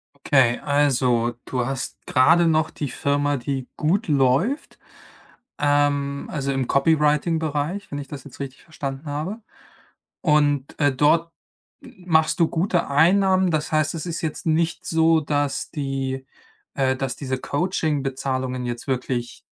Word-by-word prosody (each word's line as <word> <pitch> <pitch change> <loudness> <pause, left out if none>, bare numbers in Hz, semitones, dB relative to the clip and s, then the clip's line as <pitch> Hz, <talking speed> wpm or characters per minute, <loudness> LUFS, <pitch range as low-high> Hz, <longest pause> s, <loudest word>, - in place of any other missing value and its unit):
Okay, 135 -4 +3
also, 125 -5 +1
du 125 -2 -2
hast 135 +1 -5
grade 165 +7 +4
noch 160 0 +2
die 145 -3 -5
Firma, 145 +1 0
die 130 0 -4
gut 170 +6 +1
läuft, 145 - +1 0.8
ähm, 145 -1 +1
also, 140 -2 -2
im 135 -2 -1
Copyrighting-Bereich, 150 +4 +1
wenn 145 - -4
ich 140 - -7
das 135 -1 -8
jetzt 145 - -13
richtig 135 -1 -7
verstanden 140 -3 -6
habe 155 +10 -4 0.8
und, 145 -3 +1
äh, 145 -2 +3
dort 165 +5 +2 0.5
m 180 - -16
machst 160 -1 +3
du 165 - +5
gute 175 +1 0
Einnahmen. 185 +5 +4
Das 155 -1 -1
heißt, 155 -1 +1
es 165 - -5
ist 170 0 -4
jetzt 160 -3 -4
nicht 165 +2 +1
so, 160 -1 +3
dass 145 -1 -1
die 135 -2 -3 0.5
äh, 130 -1 +1
dass 135 -1 -3
diese 130 -2 -3
Coaching-Bezahlungen 135 -5 -2
jetzt 120 +2 -5
wirklich 125 -2 -2
145 Hz, 140 wpm, -23 LUFS, 135-160 Hz, 0.8 s, du